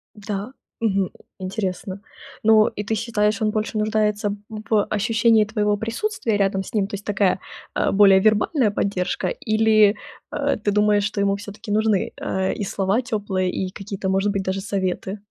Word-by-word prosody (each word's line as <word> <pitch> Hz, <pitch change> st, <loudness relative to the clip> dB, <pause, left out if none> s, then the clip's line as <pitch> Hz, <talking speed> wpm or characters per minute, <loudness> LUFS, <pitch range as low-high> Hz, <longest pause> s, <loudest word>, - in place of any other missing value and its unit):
Да, 210 Hz, +2 st, -5 dB, 0.3 s
мгм, 200 Hz, -4 st, +2 dB
м, -, -, -11 dB, 0.3 s
интересно. 190 Hz, 0 st, -4 dB, 0.4 s
Ну, 215 Hz, 0 st, +6 dB
и 210 Hz, -, -6 dB
ты 220 Hz, -, -1 dB
считаешь, 220 Hz, -1 st, 0 dB
он 215 Hz, -, +2 dB
больше 215 Hz, +1 st, -2 dB
нуждается 210 Hz, -1 st, 0 dB
в 215 Hz, -1 st, 0 dB
ощущении 220 Hz, +1 st, +3 dB
твоего 210 Hz, -1 st, 0 dB
присутствия 230 Hz, -, -2 dB
рядом 195 Hz, -1 st, +1 dB
с -, -, -11 dB
ним? 205 Hz, -3 st, +1 dB
То 200 Hz, -, -8 dB
есть 200 Hz, +1 st, -6 dB
такая, 200 Hz, -2 st, +1 dB, 0.3 s
э, -, -, +1 dB
более 195 Hz, -1 st, +6 dB
вербальная 215 Hz, +4 st, +2 dB
поддержка, 195 Hz, -2 st, -1 dB
или, 215 Hz, -, +3 dB, 0.4 s
э, -, -, 0 dB
ты 205 Hz, -, +1 dB
думаешь, 210 Hz, 0 st, +3 dB
что 210 Hz, -1 st, -2 dB
ему 200 Hz, 0 st, +2 dB
всё-таки 205 Hz, +1 st, -8 dB
нужны, 215 Hz, -2 st, +1 dB
э, 190 Hz, 0 st, -1 dB
и 205 Hz, -, -3 dB
слова 195 Hz, +4 st, 0 dB
тёплые, 205 Hz, -6 st, -1 dB
и 185 Hz, 0 st, -3 dB
какие-то, 195 Hz, -1 st, -5 dB
может 195 Hz, +2 st, +1 dB
быть, 200 Hz, -1 st, -1 dB
даже 190 Hz, +1 st, -2 dB
советы? 190 Hz, 0 st, -2 dB
205 Hz, 170 wpm, -22 LUFS, 195-215 Hz, 0.4 s, Ну